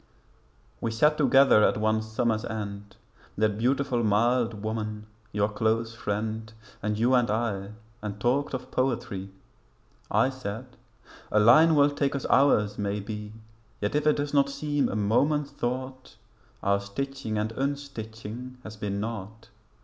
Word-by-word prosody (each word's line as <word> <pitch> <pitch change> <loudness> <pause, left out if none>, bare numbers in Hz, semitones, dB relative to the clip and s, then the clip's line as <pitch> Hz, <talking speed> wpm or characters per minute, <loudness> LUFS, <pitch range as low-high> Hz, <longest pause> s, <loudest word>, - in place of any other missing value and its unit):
We 115 - +1
sat 150 +7 +3
together 135 -6 +5
at - - +3
one 110 0 +1
summer's 110 0 -1
end 100 -2 -6 0.4
That 105 0 +1
beautiful 130 0 +1
mild 115 +1 +2
woman 110 -1 -3 0.3
your 105 0 +1
close 110 +2 0
friend 110 0 -3 0.3
And 105 0 -1
you 120 +4 +3
and 125 -3 +3
I, 105 -2 -1 0.3
and 105 -1 -5
talked 135 +6 +1
of 125 0 -7
poetry. 110 -7 -1 0.8
I 135 - +3
said 125 0 -7 0.6
'a 105 - +4
line 155 +10 +7
will 145 0 +5
take 140 -1 0
us 140 - -3
hours 105 -7 +4
maybe, 105 +1 -3 0.5
Yet 105 - -1
if 150 +1 +1
it 150 - +5
does 145 0 -3
not 140 -1 +4
seem 145 +1 -1
a - - -3
moment's 140 +8 +1
thought 130 +2 -4 0.5
Our 100 0 +2
stitching 110 +3 -4
and 105 +1 -1
unstitching 125 -3 -5
has 110 0 -9
been 100 -1 -3
naught. 110 0 -6
115 Hz, 140 wpm, -27 LUFS, 105-135 Hz, 0.8 s, line